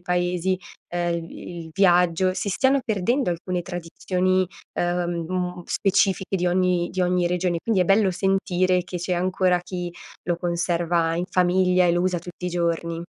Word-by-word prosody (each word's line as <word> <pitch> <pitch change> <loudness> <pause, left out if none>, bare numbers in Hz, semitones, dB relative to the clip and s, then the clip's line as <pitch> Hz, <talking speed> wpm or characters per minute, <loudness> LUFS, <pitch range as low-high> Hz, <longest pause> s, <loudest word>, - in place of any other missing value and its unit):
paesi, 180 +1 0 0.3
ehm, 175 -1 -1
il 170 - -5
vi 175 +1 -9
il - - -12
viaggio, 180 -1 +3
si 195 - -2
stiano 265 +7 +3
perdendo 225 +3 0
alcune 175 +1 -2
tradizioni, 180 +2 -1 0.3
uhm, 175 0 -2
specifiche 195 -1 +1
di 180 -1 0
ogni 180 -1 +2
di 185 - -3
ogni 180 0 +2
regione. 175 0 0
Quindi 220 -2 +1
è - - -1
bello 195 +1 +3
sentire 185 -1 +1
che 180 - -6
c'è 175 +2 -3
ancora 185 0 +1
chi 180 -1 -5 0.3
lo 175 -1 -1
conserva 170 -1 0
in 175 - -1
famiglia 180 0 +3
e - - +4
lo 175 +1 +1
usa 180 -1 +1
tutti 175 +1 -7
i - - 0
giorni. 170 -1 -1
180 Hz, 165 wpm, -24 LUFS, 175-185 Hz, 0.3 s, e